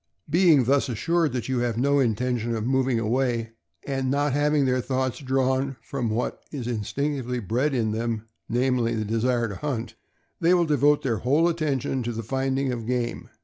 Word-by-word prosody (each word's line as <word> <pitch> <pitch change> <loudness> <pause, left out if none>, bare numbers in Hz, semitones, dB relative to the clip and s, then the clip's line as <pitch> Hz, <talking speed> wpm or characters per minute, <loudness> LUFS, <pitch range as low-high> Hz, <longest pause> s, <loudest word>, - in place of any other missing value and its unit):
Being 160 -3 +5
thus 135 +3 +2
assured 165 +6 +1
that 125 -3 -3
you 130 -2 0
have 120 -2 -1
no 140 +3 +3
intention 120 -1 0
of 110 -1 -3
moving 130 -1 +1
away, 115 0 0 0.3
and 135 -2 -1
not 145 0 +1
having 145 0 +2
their 130 0 +1
thoughts 130 0 -1
drawn 130 0 0
from 120 +1 -3
what 110 +3 -2
is 135 -5 -5
instinctively 125 +3 -2
bred 125 +7 0
in 110 -3 +1
them, 115 0 -2 0.2
namely, 120 -1 +1
the 110 -1 -2
desire 115 +2 +1
to 100 - -6
hunt, 135 -7 -3 0.5
they 175 +2 +4
will 175 -1 +3
devote 145 -1 +3
their 120 -5 0
whole 140 +10 +2
attention 145 -6 -1
to 120 0 -3
the 115 +1 -4
finding 135 +2 -1
of 115 -2 -5
game. 120 -1 -2
130 Hz, 180 wpm, -25 LUFS, 115-140 Hz, 0.5 s, Being